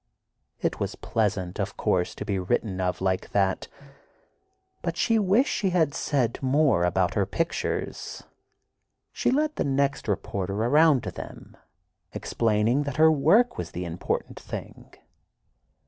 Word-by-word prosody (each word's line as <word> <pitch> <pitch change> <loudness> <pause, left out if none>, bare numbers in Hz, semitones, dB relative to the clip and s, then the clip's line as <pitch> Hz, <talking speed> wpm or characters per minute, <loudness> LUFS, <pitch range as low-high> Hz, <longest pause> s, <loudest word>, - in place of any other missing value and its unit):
It - - -1
was - - -2
pleasant, 100 -4 -1
of 100 0 -3
course, 90 -1 0
to - - -6
be 100 -2 -1
written 95 0 -1
of 90 0 -1
like 95 -1 0
that, 95 -2 +1 1.1
but 170 -1 -3
she 225 +4 +3
wished 210 +7 +2
he 195 - +2
had 165 -5 +2
said 130 -6 0
more 135 - +3
about 90 0 +1
her 100 -2 +1
pictures. 165 0 -3 0.9
She - - 0
led 300 +3 +1
the - - +1
next 140 -1 0
reporter 100 -1 -2
around 140 +5 +4
to - - -4
them, - - -10 0.6
explaining 115 +4 +1
that 145 0 -4
her 160 0 +7
work 225 - +3
was - - -4
the 90 +1 -4
important 85 0 -3
thing. - - -8
120 Hz, 140 wpm, -26 LUFS, 95-160 Hz, 1.1 s, her